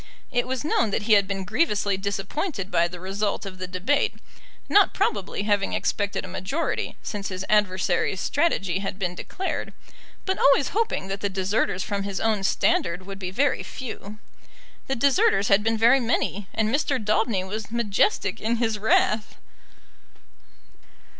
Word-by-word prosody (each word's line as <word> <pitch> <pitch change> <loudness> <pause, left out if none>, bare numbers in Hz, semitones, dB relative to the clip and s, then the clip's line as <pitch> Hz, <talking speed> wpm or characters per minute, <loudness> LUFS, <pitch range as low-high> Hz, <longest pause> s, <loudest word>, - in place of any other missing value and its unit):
It 245 0 0
was 260 +2 -3
known 230 -7 +2
that 205 - -1
he 220 +1 +4
had 200 -2 +5
been 195 -1 -3
grievously 205 - +1
disappointed 200 - -3
by 170 0 +3
the 180 0 -9
result 200 +3 -2
of 185 -1 -8
the 185 - -4
debate, 185 +10 0 0.5
not 405 -1 +4
probably 200 - -1
having 205 -1 +1
expected 205 -1 -1
a - - -8
majority 190 - -2
since 205 -2 -4
his 185 0 -4
adversary's 190 -2 +1
strategy 195 - 0
had 195 -1 -4
been 180 -3 -2
declared, 375 - -4 0.5
but 380 - -1
always 275 0 +4
hoping 430 - -1
that 195 +1 -4
the 200 - 0
deserters 190 0 0
from 200 -1 -2
his 200 -1 -3
own 220 -2 +1
standard 180 -1 +1
would 195 0 -8
be 185 -2 -4
very 265 +8 +1
few. 215 -4 -7 0.7
The 270 - 0
deserters 230 -6 +3
had 200 +1 +5
been 225 +1 +1
very 235 +4 +5
many, 210 -5 -1
and 220 +1 0
Mr. 280 -1 +1
Daubeny 215 -2 +1
was 205 +2 -5
majestic 235 - 0
in 225 +2 +1
his 225 -2 0
wrath. 215 0 +2
205 Hz, 160 wpm, -25 LUFS, 195-235 Hz, 0.7 s, had